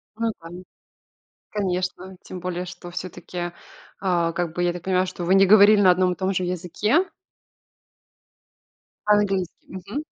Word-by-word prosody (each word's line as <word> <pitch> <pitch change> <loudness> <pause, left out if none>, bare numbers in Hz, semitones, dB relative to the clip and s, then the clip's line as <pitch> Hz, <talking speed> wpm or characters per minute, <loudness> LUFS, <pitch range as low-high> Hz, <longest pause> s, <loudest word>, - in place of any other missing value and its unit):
Мгм. 185 -6 -5 0.9
Конечно. 185 -2 -3
Тем 185 - -8
более 180 0 -4
что 175 0 -9
всё-таки, 175 0 -6 0.5
а, 175 -3 +1
как 170 -1 -2
бы, 175 - -1
я 175 0 +2
так 175 -1 -8
понимаю, 185 0 +2
что 185 -1 -6
вы 180 +2 +3
не 195 0 +6
говорили 205 +1 +7
на 190 -2 +6
одном 180 0 +3
и - - -6
том 190 0 -1
же 185 - 0
языке? 180 - 0 2.0
По-английски, 200 -4 +2
мгм. 190 +5 -7
185 Hz, 140 wpm, -23 LUFS, 175-195 Hz, 2.0 s, говорили